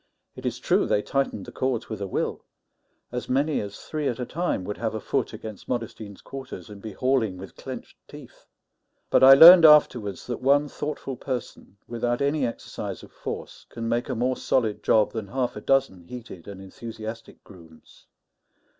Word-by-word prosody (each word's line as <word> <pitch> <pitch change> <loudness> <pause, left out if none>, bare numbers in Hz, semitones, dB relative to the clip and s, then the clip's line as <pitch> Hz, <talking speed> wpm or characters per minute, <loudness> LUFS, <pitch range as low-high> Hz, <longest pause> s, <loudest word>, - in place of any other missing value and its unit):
It - - -5
is - - -3
true - - +1
they 105 - +1
tightened 135 -8 -2
the - - -10
cords 130 -3 -2
with 110 -3 -6
a 100 - -2
will; - - -3 0.7
as 125 0 -5
many 140 +4 +1
as 100 -1 -7
three 155 -2 -4
at 120 - -2
a 125 - -2
time 170 - -2
would 105 +2 -5
have 110 -1 -2
a - - -2
foot - - -1
against 110 -3 -9
Modestine's 110 -4 -5
quarters, 135 -5 -9
and 100 -1 -11
be 110 -1 -7
hauling 125 -7 0
with 95 0 -10
clenched - - -9
teeth; - - -14 0.6
but - - +5
I 135 +1 +11
learned 170 +4 +11
afterwards 125 - +5
that 120 -1 -5
one 140 +3 +3
thoughtful 145 -3 -5
person, 125 -6 -6
without 120 +1 -1
any 140 -1 +1
exercise 115 - -7
of - - -14
force, - - -7
can 115 -1 -5
make 120 +3 -1
a 130 - -1
more 125 +2 0
solid 110 -5 0
job 110 -1 +3
than 110 -3 -5
half 125 +3 -2
a 105 - -7
dozen 135 -9 +1
heated 115 -7 -10
and 100 -2 -8
enthusiastic 110 +3 -9
grooms. 85 -5 -17
120 Hz, 180 wpm, -25 LUFS, 105-135 Hz, 0.7 s, I